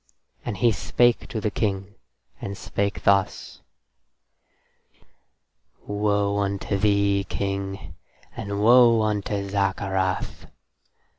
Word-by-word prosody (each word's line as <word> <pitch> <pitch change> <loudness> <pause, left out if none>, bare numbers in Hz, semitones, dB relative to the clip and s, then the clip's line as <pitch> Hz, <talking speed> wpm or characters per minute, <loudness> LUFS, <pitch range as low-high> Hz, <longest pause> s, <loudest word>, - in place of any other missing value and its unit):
And 105 - -4
he 115 +4 +3
spake 120 +2 +1
to 110 - -4
the 105 0 -1
King, 100 -2 -2 0.5
and 100 0 -5
spake 100 +2 -3
thus: 100 -1 +1 2.2
"Woe 100 0 0
unto 100 0 -2
thee, 100 -1 +2
King, 100 -1 -4 0.4
and 100 -3 -3
woe 115 -1 +6
unto 105 -1 -2
Zaccarath. 95 -1 -1
100 Hz, 90 wpm, -24 LUFS, 100-105 Hz, 2.2 s, woe